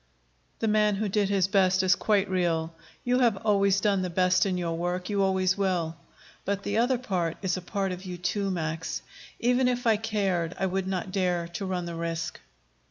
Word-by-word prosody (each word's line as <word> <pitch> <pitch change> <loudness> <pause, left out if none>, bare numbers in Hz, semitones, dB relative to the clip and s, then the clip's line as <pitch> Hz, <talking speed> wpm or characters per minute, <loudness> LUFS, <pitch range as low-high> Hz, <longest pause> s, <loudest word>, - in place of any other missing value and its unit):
"The 225 - -1
man 210 -1 +3
who 210 +2 -1
did 200 0 +1
his 195 -2 +2
best 190 -1 +3
is 185 0 +5
quite 205 -2 +1
real. 170 -3 0 0.3
You 250 +1 +2
have 235 -5 +3
always 200 -2 +3
done 200 -2 +2
the 185 - -2
best 185 +2 +3
in 185 -2 -1
your 170 -2 -2
work; 180 +3 -2
you 200 -1 +1
always 190 -1 +2
will. 175 -4 0 0.5
But 200 0 -2
the 205 +2 0
other 245 +1 +2 0.4
is 190 -2 +1
a 185 - -4
part 195 +1 -2
of 180 +1 -6
you 180 -2 -6
too, 195 +3 -1
Max. 160 -3 -3 0.4
Even 250 +2 +3
if 245 0 -1
I 225 -2 +4
cared, 195 -6 -1
I 195 - 0
would 190 0 -1
not 185 -1 -3
dare 180 -3 0
to 190 +3 -5
run 180 -2 -2
the 170 - -5
risk." 165 0 -3
190 Hz, 200 wpm, -27 LUFS, 180-205 Hz, 0.5 s, is